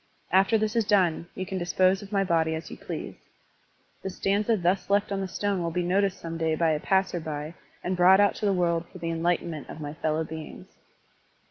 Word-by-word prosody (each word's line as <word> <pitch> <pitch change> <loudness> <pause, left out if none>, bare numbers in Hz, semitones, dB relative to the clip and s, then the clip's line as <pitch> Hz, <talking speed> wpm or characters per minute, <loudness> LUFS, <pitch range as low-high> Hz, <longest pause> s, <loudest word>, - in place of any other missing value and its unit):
After 190 +5 +4
this 215 +1 -1
is 230 - +3
done, 180 -5 +2
you 185 - -3
can 190 +1 -4
dispose 185 +3 +2
of 200 0 -11
my 195 -1 +2
body 165 -3 +1
as 160 - -7
you - - -6
please. - - -6 0.9
The 190 - -4
stanza 205 +4 +1
thus 180 +1 0
left 200 0 +2
on 195 -1 -1
the 190 - -2
stone 200 0 -1
will 170 - -1
be 175 +2 -1
noticed 195 +1 +1
some 165 0 -6
day 160 -1 +1
by 165 0 +2
a 155 - 0
passer 190 0 +1
by 155 0 -5 0.3
and 185 +1 -1
brought 185 +2 +6
out 205 0 +4
to - - -3
the - - +3
world 170 -2 0
for - - -10
the 165 -1 -3
enlightenment 165 -2 -1
of - - -8
my 145 -1 -5
fellow 155 0 -1
beings. 160 -1 -8
180 Hz, 220 wpm, -27 LUFS, 165-195 Hz, 0.9 s, brought